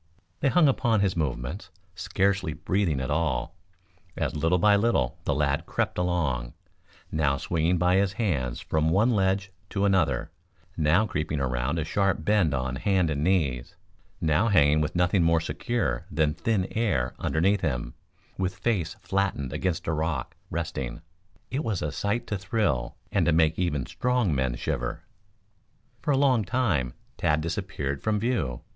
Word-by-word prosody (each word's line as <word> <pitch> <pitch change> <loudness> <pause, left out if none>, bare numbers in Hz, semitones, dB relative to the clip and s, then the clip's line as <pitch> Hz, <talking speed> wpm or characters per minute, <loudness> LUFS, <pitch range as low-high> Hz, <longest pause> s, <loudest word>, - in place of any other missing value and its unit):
They 140 - +2
hung 175 +1 +5
upon 120 -5 +2
his 95 -2 +1
movements, 75 +2 -3 0.2
scarcely 95 -1 0
breathing 90 -2 0
at 65 +2 -3
all, 80 +1 -1 0.6
as - - -1
little 80 +4 +2
by 105 +3 +5
little 100 - +1
the 75 - +1
lad 75 +3 0
crept - - -1
along, 75 -10 -1 0.6
now 70 -3 +1
swinging 85 0 0
by 90 +2 +3
his 100 -1 +2
hands 70 - -1
from 80 0 0
one 105 +9 +3
ledge 95 -2 +1 0.2
to 100 0 0
another, 80 -7 +1 0.4
now 80 +7 +3
creeping 75 -6 -2
around 65 +3 -1
a 80 - 0
sharp 95 -2 0
bend 100 -6 +3
on 65 -1 -2
hand 95 -1 +1
and 70 0 -1
knees, 75 -9 0 0.4
now 80 +7 +2
hanging 75 -7 +4
with 75 +2 -2
nothing 90 +2 +3
more 85 0 +4
secure 90 +3 -2
than 75 -3 +1
thin 105 -1 0
air 80 - 0
underneath 95 +5 +1
him, 60 -6 -2 0.5
with 95 0 -1
face 95 -7 -1
flattened 95 -9 -1
against 90 -1 -2
a 80 - 0
rock, 80 -4 -2
resting. 65 +4 -4 0.5
It 140 +4 -1
was 105 -8 -2
a 75 - -1
sight 115 +4 -1
to 105 -4 -3
thrill 95 - -1 0.2
and - - +2
to - - +5
make 80 0 +3
even 75 -8 0
strong 125 - 0
men 65 -3 0
shiver. - - -3 1.0
For - - -4
a 140 - +4
long 130 -5 +3
time 95 - 0 0.2
Tad 75 +1 +1
disappeared 80 -5 -3
from 110 -1 0
view. 100 - -1
85 Hz, 160 wpm, -27 LUFS, 75-100 Hz, 1.0 s, hung